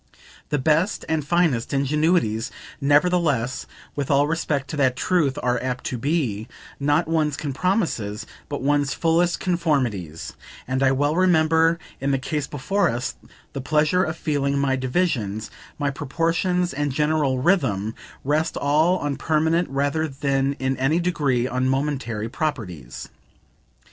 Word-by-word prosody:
The 150 Hz, -, +1 dB
best 155 Hz, +8 st, +1 dB
and 160 Hz, -2 st, 0 dB
finest 150 Hz, -6 st, +1 dB
ingenuities, 140 Hz, -5 st, +1 dB, 0.3 s
nevertheless, 145 Hz, -4 st, +2 dB, 0.3 s
with 140 Hz, -2 st, -3 dB
all 140 Hz, 0 st, +4 dB
respect 150 Hz, -3 st, -1 dB
to 155 Hz, -, -4 dB
that 130 Hz, -3 st, +3 dB
truth, 155 Hz, -4 st, +1 dB
are 125 Hz, 0 st, +1 dB
apt 130 Hz, 0 st, -3 dB
to 125 Hz, -, -3 dB
be, 130 Hz, -7 st, -1 dB, 0.3 s
not 145 Hz, +4 st, +2 dB
one's 155 Hz, -3 st, +1 dB
compromises, 145 Hz, -, -1 dB, 0.2 s
but 145 Hz, -3 st, -4 dB
one's 145 Hz, 0 st, +1 dB
fullest 170 Hz, +1 st, +2 dB
conformities, 130 Hz, -, -1 dB, 0.3 s
and 130 Hz, +1 st, -1 dB
I 135 Hz, -1 st, +4 dB
well 145 Hz, +3 st, +1 dB
remember, 165 Hz, -2 st, +4 dB, 0.2 s
in 135 Hz, -, -1 dB
the 135 Hz, -, +2 dB
case 145 Hz, +2 st, -3 dB
before 175 Hz, +9 st, 0 dB
us, 120 Hz, +2 st, -2 dB, 0.4 s
the 135 Hz, -, -4 dB
pleasure 155 Hz, +6 st, +2 dB
of 160 Hz, -1 st, -3 dB
feeling 140 Hz, -3 st, 0 dB
my 140 Hz, -1 st, +2 dB
divisions, 130 Hz, -, -1 dB, 0.3 s
my 145 Hz, -2 st, 0 dB
proportions 165 Hz, +5 st, 0 dB
and 145 Hz, +1 st, -1 dB
general 150 Hz, -1 st, +1 dB
rhythm, 125 Hz, -, +1 dB, 0.3 s
rest 150 Hz, +4 st, 0 dB
all 155 Hz, +6 st, +3 dB
on 145 Hz, -5 st, -2 dB
permanent 160 Hz, +3 st, +1 dB
rather 145 Hz, +3 st, 0 dB
than 135 Hz, -1 st, 0 dB
in 130 Hz, -1 st, -2 dB
any 135 Hz, +6 st, +2 dB
degree 145 Hz, -8 st, +1 dB
on 130 Hz, +1 st, 0 dB
momentary 130 Hz, -6 st, -1 dB
proprieties. 110 Hz, -, -4 dB
145 Hz, 140 wpm, -23 LUFS, 130-160 Hz, 0.4 s, all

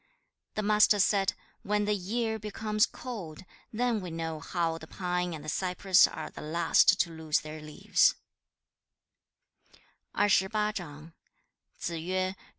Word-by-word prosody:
The 215 Hz, -, -1 dB
Master 210 Hz, 0 st, +5 dB
said, 195 Hz, -1 st, +2 dB, 0.3 s
'When 210 Hz, +1 st, 0 dB
the 210 Hz, -, +1 dB
year 220 Hz, +3 st, -2 dB
becomes 210 Hz, 0 st, 0 dB
cold, 190 Hz, -9 st, -8 dB, 0.3 s
then 235 Hz, -1 st, 0 dB
we 180 Hz, -, -6 dB
know 165 Hz, -1 st, -4 dB
how 165 Hz, -2 st, -2 dB
the 160 Hz, -, -11 dB
pine 180 Hz, -1 st, -2 dB
and 155 Hz, -1 st, -10 dB
the -, -, -9 dB
cypress 185 Hz, +2 st, +3 dB
are 155 Hz, -, -7 dB
the -, -, -10 dB
last 170 Hz, +5 st, +3 dB
to 170 Hz, -, -1 dB
lose 160 Hz, -2 st, -1 dB
their 155 Hz, 0 st, -8 dB
leaves.' 150 Hz, 0 st, +2 dB
185 Hz, 115 wpm, -29 LUFS, 165-210 Hz, 0.3 s, Master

